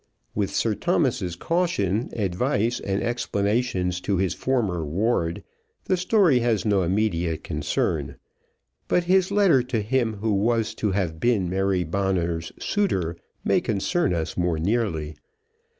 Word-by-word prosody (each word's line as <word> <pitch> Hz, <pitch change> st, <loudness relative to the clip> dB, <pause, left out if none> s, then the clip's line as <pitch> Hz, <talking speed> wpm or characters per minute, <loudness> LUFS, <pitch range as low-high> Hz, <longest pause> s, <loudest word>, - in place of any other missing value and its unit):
With 100 Hz, -2 st, 0 dB
Sir 115 Hz, -, 0 dB
Thomas's 90 Hz, -3 st, 0 dB
caution, 120 Hz, -, 0 dB
advice, 115 Hz, +4 st, 0 dB
and 100 Hz, 0 st, -2 dB
explanations 100 Hz, -5 st, 0 dB
to 100 Hz, 0 st, 0 dB
his 95 Hz, -1 st, +1 dB
former 105 Hz, -11 st, -1 dB
ward, 85 Hz, +1 st, -1 dB, 0.4 s
the 185 Hz, -, +2 dB
story 180 Hz, -, +3 dB
has 115 Hz, -3 st, 0 dB
no 100 Hz, -3 st, +3 dB
immediate 85 Hz, -3 st, 0 dB
concern; 75 Hz, -2 st, -1 dB, 0.7 s
but 180 Hz, -, +2 dB
his 185 Hz, +1 st, +3 dB
letter 200 Hz, -9 st, +4 dB
to 125 Hz, -2 st, -2 dB
him 115 Hz, 0 st, 0 dB
who 105 Hz, +1 st, -1 dB
was 110 Hz, +2 st, +1 dB
to 105 Hz, -, -1 dB
have 90 Hz, -5 st, -1 dB
been 105 Hz, -3 st, +2 dB
Mary 95 Hz, -1 st, +1 dB
Bonner's 85 Hz, -2 st, -1 dB
suitor 95 Hz, -, 0 dB, 0.3 s
may -, -, +2 dB
concern 150 Hz, -, 0 dB
us 80 Hz, -1 st, -3 dB
more 90 Hz, -2 st, 0 dB
nearly. 85 Hz, -5 st, -1 dB
100 Hz, 135 wpm, -24 LUFS, 90-120 Hz, 0.7 s, letter